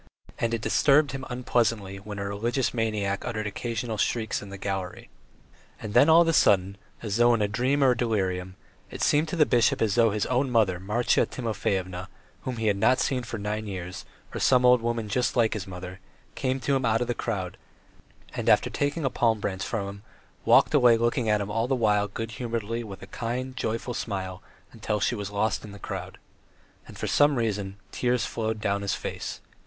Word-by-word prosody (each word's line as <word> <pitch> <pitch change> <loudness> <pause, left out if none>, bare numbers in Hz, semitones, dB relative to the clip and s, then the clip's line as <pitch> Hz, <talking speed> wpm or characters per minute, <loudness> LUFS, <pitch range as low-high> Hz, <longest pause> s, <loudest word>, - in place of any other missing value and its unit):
And 115 - 0
it 115 -2 -1
disturbed 145 0 +4
him 135 -1 -5
unpleasantly 115 -5 0
when 100 +1 -8
a 100 - -3
religious 115 +6 -1
maniac 105 -4 -1
uttered 110 -3 -3
occasional 115 +1 -3
shrieks 110 0 0
in 100 - -9
the 100 - -7
gallery. 95 -2 -5 0.7
And 105 -1 -6
then 145 - +6
all 165 +1 +8
of - - -3
a 165 - +3
sudden, 100 -7 +3 0.3
as 105 -1 -2
though 120 0 +5
in 110 - -1
a - - +2
dream 130 +7 +1
or 130 -2 +5
delirium, 95 -6 -1 0.3
it - - -5
seemed 150 +2 +3
to 155 - -3
the 155 -3 +5
bishop 120 -4 +3
as 110 -3 +1
though 115 0 +4
his 105 0 -1
own 130 +2 +1
mother 105 -7 +2
Marya 105 +6 +1
Timofyevna, 95 -6 -3 0.3
whom 130 -3 -4
he 115 - -2
had 105 -2 +2
not 115 +5 +4
seen 130 -3 0
for 120 -1 -6
nine 105 +1 -3
years, 90 -2 -6 0.3
or - - -3
some 125 -1 +4
old 125 -1 +6
woman 115 -1 -2
just 125 +5 0
like 115 -3 +3
his 105 -4 -5
mother, 90 0 -8 0.3
came 130 -1 -1
up 130 - -11
to 140 - +2
him 135 - 0
out 115 -1 +2
of 120 - -1
the 120 - 0
crowd, 95 -7 -3 0.8
and, - - -1
after - - +4
taking 145 +2 -1
a 135 - +1
palm 115 -3 +2
branch 95 -1 -3
from 100 -3 -2
him, 100 +1 -9 0.4
walked - - +5
away 120 -2 +6
looking 120 0 0
at 105 -1 +2
him 100 +1 -4
all 115 +2 0
the 135 - +1
while 105 -4 +2
good 115 +3 -5
humouredly 115 0 -3
with 100 -4 -9
a - - -13
kind, 125 +2 -3
joyful 115 0 -3
smile 95 -5 -4 0.3
until 110 -2 -2
she 105 - +1
was 105 -3 -4
lost 105 +1 -1
in 105 - -9
the - - -9
crowd. - - -6 0.7
And - - -12
for - - -3
some 145 0 +4
reason 100 -5 -2
tears 125 -2 0
flowed 110 -1 -3
down 100 -1 0
his 100 -1 -1
face. - - -5
110 Hz, 210 wpm, -26 LUFS, 100-125 Hz, 0.8 s, all